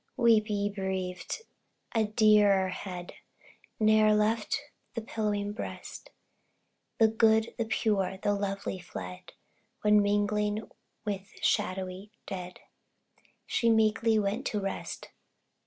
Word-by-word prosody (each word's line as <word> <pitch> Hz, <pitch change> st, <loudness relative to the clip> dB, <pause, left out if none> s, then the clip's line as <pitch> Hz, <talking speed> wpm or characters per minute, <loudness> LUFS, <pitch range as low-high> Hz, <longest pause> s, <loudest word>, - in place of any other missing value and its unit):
Weep, 230 Hz, -3 st, +4 dB
ye 205 Hz, -1 st, 0 dB
bereaved! 190 Hz, -, -4 dB, 0.5 s
a 225 Hz, -2 st, +3 dB
dearer 210 Hz, -3 st, +4 dB
head, 180 Hz, -1 st, -6 dB, 0.7 s
Ne'er 215 Hz, 0 st, +5 dB
left 215 Hz, +3 st, +1 dB, 0.4 s
the 230 Hz, -, -2 dB
pillowing 205 Hz, -2 st, -2 dB
breast; -, -, -7 dB, 0.9 s
The 225 Hz, -, +6 dB
good, 220 Hz, 0 st, +3 dB
the 230 Hz, -, +1 dB
pure, 200 Hz, -3 st, 0 dB
the 205 Hz, +2 st, 0 dB
lovely 200 Hz, -1 st, -3 dB
fled, 90 Hz, -, -8 dB, 0.5 s
When 210 Hz, 0 st, +6 dB
mingling 205 Hz, +1 st, 0 dB, 0.4 s
with 195 Hz, -2 st, -4 dB
the -, -, -15 dB
shadowy 185 Hz, +2 st, -1 dB, 0.2 s
dead, 180 Hz, -1 st, -7 dB, 0.8 s
She 230 Hz, -, +1 dB
meekly 220 Hz, 0 st, +3 dB
went 210 Hz, +5 st, 0 dB
to 210 Hz, -, -1 dB
rest. 195 Hz, -1 st, -5 dB
210 Hz, 110 wpm, -29 LUFS, 195-220 Hz, 0.9 s, The